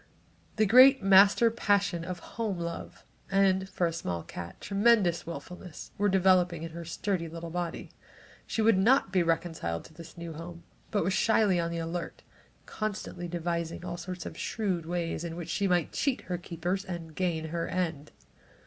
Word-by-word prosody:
The 215 - +3
great 255 +3 +7
master 200 +4 +6
passion 200 -6 +1
of 180 +1 -5 0.2
home 210 -5 -1
love 170 0 -6 0.3
and, 195 -1 +2
for 185 -2 0
a 165 - -1
small 90 - -3
cat, 85 +1 -8
a - - -31
tremendous 200 -5 +2
wilfulness 180 0 -8
were 205 +1 +1
developing 180 -3 +3
in 165 - -6
her 170 +1 -7
sturdy 170 +1 -2
little 165 0 -7
body. 175 -1 -4 0.6
She 225 - 0
would 215 -3 +5
not 225 -1 +4
be 185 -1 +3
reconciled 165 - -1
to 160 - -15
this 165 +1 -12
new 170 -1 -6
home 170 +2 -9 0.3
but 205 - +1
was 185 +3 0
slyly 200 -1 +3
on 170 0 -1
the 170 - -4
alert, 165 +1 -5 0.4
constantly 205 -4 -4
devising 170 0 -3
all 175 -1 -4
sorts 180 0 -6
of - - -7
shrewd 185 -7 -2
ways 170 -1 -2
in 165 -1 -5
which 170 -1 -6
she 200 - 0
might 175 -3 +1
cheat 275 -4 0
her 180 -1 -4
keepers 175 +3 -3
and 170 -4 -7
gain 160 -3 -1
her 170 +1 -2
end. 160 -5 -3
175 Hz, 175 wpm, -29 LUFS, 165-195 Hz, 0.6 s, great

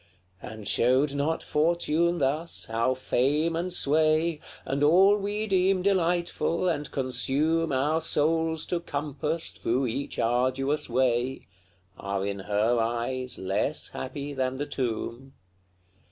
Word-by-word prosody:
And 110 -2 -8
showed 130 +4 +3
not 145 +3 -1
Fortune 170 +2 +1
thus 155 +3 -2
how 115 +3 0
fame 145 +6 +1
and 175 +2 -2
sway, 155 0 +2 0.3
And 140 +2 -1
all 190 +7 +6
we 210 +1 -2
deem 190 -2 +2
delightful, 175 -2 +1
and 150 -4 -1
consume 145 +5 0
Our 145 +5 +1
souls 160 +1 0
to 175 - -1
compass 150 +1 -3
through 125 +3 -1
each 125 +4 -4
arduous 130 +5 0
way, 125 +1 0 0.5
Are 100 0 -2
in 100 0 -3
her 105 +4 +1
eyes 120 +3 -2
less 100 +10 -1
happy 140 +2 -6
than 130 -1 -1
the 145 +2 -3
tomb? 125 0 -4
145 Hz, 125 wpm, -27 LUFS, 130-165 Hz, 0.5 s, all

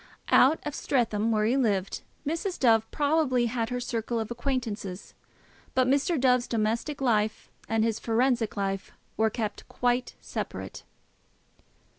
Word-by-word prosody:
Out 285 +5 +6
at 295 - -4
Streatham, 230 -6 0
where 215 -1 +2
he 235 +4 +2
lived, 205 -8 0 0.2
Mrs. 335 +5 -2
Dove 225 -3 +3
probably 285 -5 +2
had 230 -1 -1
her 250 0 -2
circle 235 -1 -2
of 220 +1 -4
acquaintance; 230 -7 -3 0.6
but 255 -1 +3
Mr. 285 +4 +2
Dove's 250 -1 +3
domestic 235 +6 -1
life 215 -4 0 0.2
and 225 0 +2
his 225 -1 0
forensic 235 -1 +1
life 195 -1 -2 0.2
were 220 0 +2
kept 215 -2 -4
quite 245 0 0
separate. - - -6
235 Hz, 135 wpm, -28 LUFS, 220-260 Hz, 0.6 s, Out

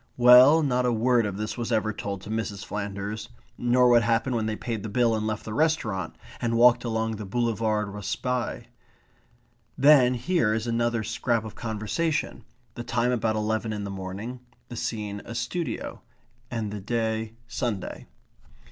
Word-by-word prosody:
Well, 125 +6 +8
not 125 -3 +1
a - - +2
word 120 0 +2
of 100 -1 -5
this 105 +3 -4
was 120 - -3
ever 110 0 +1
told 100 -2 -5
to 105 - -8
Mrs. 105 -3 -3
Flanders; 100 +1 -5 0.3
nor 125 +1 +3
what 120 -1 +6
happened 115 +2 +1
when 110 -2 0
they 110 - -1
paid 115 -1 -4
the 110 - -5
bill 115 +2 +2
and 110 0 -2
left 110 0 -3
the 110 - -5
restaurant, 110 - 0 0.3
and 115 -1 0
walked 120 +1 +6
along 110 -2 -1
the 105 - -6
Boulevard 110 -1 0
Raspaille. 120 +5 -3 1.1
Then 135 -3 +6
here 125 -4 +1
is 110 0 -2
another 115 -1 0
scrap 115 0 -1
of 110 - -7
conversation; 115 +9 -2 0.3
the 120 - -6
time 120 +1 0
about 110 -2 0
eleven 110 +1 -1
in 105 -1 -4
the 100 - -5
morning; 100 +6 -6 0.3
the 120 - -7
scene 105 -3 -4
a 115 - -8
studio; 175 +6 -3 0.5
and 110 -3 -3
the 105 -1 -5
day 110 +1 -2
Sunday. 115 -6 -4
115 Hz, 165 wpm, -26 LUFS, 105-120 Hz, 1.1 s, Well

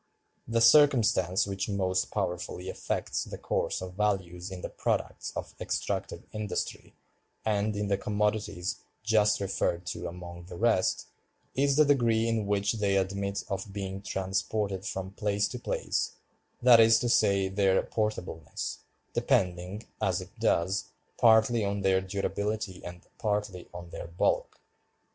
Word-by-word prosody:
The 115 0 +1
circumstance 115 - +5
which 100 +1 -3
most 95 -2 0
powerfully 90 +1 -3
affects - - -2
the - - -7
course - - -1
of 90 -1 -7
values 95 -3 -1
in 95 -1 -7
the - - -4
products - - -2
of - - -5
extractive - - -2
industry, 105 -2 -4 0.5
and 105 0 +1
in 105 0 -1
the 100 -1 +1
commodities 105 -3 -1 0.3
just 110 -2 +3
referred 95 -3 -1
to - - -5
among 85 0 -8
the 90 0 -9
rest, 110 -2 +2 0.5
is 140 +1 +2
the 155 +1 +6
degree 115 -5 +3
in 110 -3 0
which 100 0 +1
they 100 -1 +2
admit 100 +1 -1
of 95 0 -4
being 95 -1 -4
transported 95 +1 -2
from 95 0 -4
place 105 0 0
to 125 - -6
place—that 120 0 +1
is 115 0 +7
to 120 - -1
say, 100 -4 +3
their 95 0 +3
portableness—depending, 90 -1 -2 0.2
as - - +1
it - - -9
does, 95 +3 +1 0.3
partly 110 0 +5
on 100 0 -1
their 95 -1 +3
durability 100 0 -3
and 90 0 -9
partly 105 -4 -2
on 85 -1 -9
their - - -6
bulk." 85 +2 0
100 Hz, 135 wpm, -29 LUFS, 95-110 Hz, 0.5 s, is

